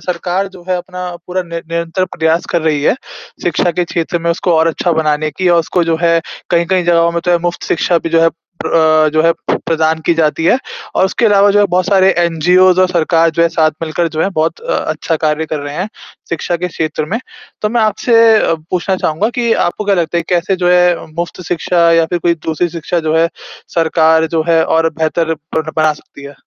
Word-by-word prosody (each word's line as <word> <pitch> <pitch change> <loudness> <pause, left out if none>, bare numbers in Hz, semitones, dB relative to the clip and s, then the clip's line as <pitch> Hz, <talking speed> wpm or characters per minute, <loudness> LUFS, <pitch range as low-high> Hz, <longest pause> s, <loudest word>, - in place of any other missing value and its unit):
सरकार 180 +2 -2
जो 190 -2 -14
है 185 - +1
अपना 180 0 -6 0.2
पूरा 185 +1 -2
नि 170 -1 -7
निरंतर 170 +2 -2
प्रयास 160 +1 +1
कर 170 - +1
रही 150 -3 0
है - - +3 0.5
शिक्षा 175 - +1
के 175 +1 -1
क्षेत्र 170 0 -2
में 170 0 -1
उसको 170 +1 0
और 160 +1 +3
अच्छा 170 +1 -1
बनाने 155 -1 0
की 180 +5 -1
और 170 -1 +4
उसको 175 +2 -1
जो 165 -1 0
है 170 -1 +3 0.3
कहीं-कहीं 175 +1 +1
जगहों 170 -1 +3
में 170 - -1
तो 180 - +1
है 175 - +3
मुफ्त 175 0 -3
शिक्षा 170 0 +1
भी 165 - -4
जो 165 0 +3
है 165 - +5
प्र 165 - -34 0.7
अ, - - +3
जो 155 0 +2
है 165 +1 +4 0.3
प्रदान 160 -1 +1
की - - +4
जाती 160 0 0
है। 240 - +4 0.4
और - - +4
उसके 195 +4 +1
अलावा 205 -1 +4
जो 205 - +3
है 205 - +5
बहुत 180 0 +1
सारे 190 -1 +4
एनजीओज़ 180 +2 +3
और 185 - +4
सरकार 165 -1 +2
जो 170 +1 0
है 170 - +4
साथ 160 -1 +2
मिलकर 165 +1 -1
जो 160 0 -2
है - - +1
बहुत 160 - -1
अ, - - -4
अच्छा 165 - -2
कार्य 155 0 -1
कर 155 - -3
रहे 145 0 -6
हैं 190 +4 -3 0.4
शिक्षा 170 +1 -2
के 180 +1 -3
क्षेत्र 155 -2 -3
में। 205 +9 -3 0.4
तो 210 - +1
मैं 235 +2 0
आपसे 220 +2 +1 0.2
अ, 165 - +1 0.2
पूछना 185 +1 -1
चाहूँगा 170 +4 0
कि 235 -2 +1
आपको 175 +4 -3
क्या 200 -1 +2
लगता 170 -2 -1
है - - -1
कैसे 180 +2 0
जो 180 -1 0
है 180 -1 +3
मुफ्त 170 +1 -4
शिक्षा 170 0 +2
या 165 -1 +3
फ़िर 175 +1 -2
कोई 170 0 +1
दूसरी 160 +2 0
शिक्षा 170 +1 -3
जो 155 - +2
है 165 +1 +3 0.5
सरकार 160 -1 +3
जो 160 - +2
है 165 -1 +4
और 165 0 +1
बेहतर 160 +1 0
बन 160 +1 -5
बना 155 -1 +3
सकती 145 -1 -15
है? 140 0 -10
170 Hz, 230 wpm, -14 LUFS, 160-180 Hz, 0.7 s, है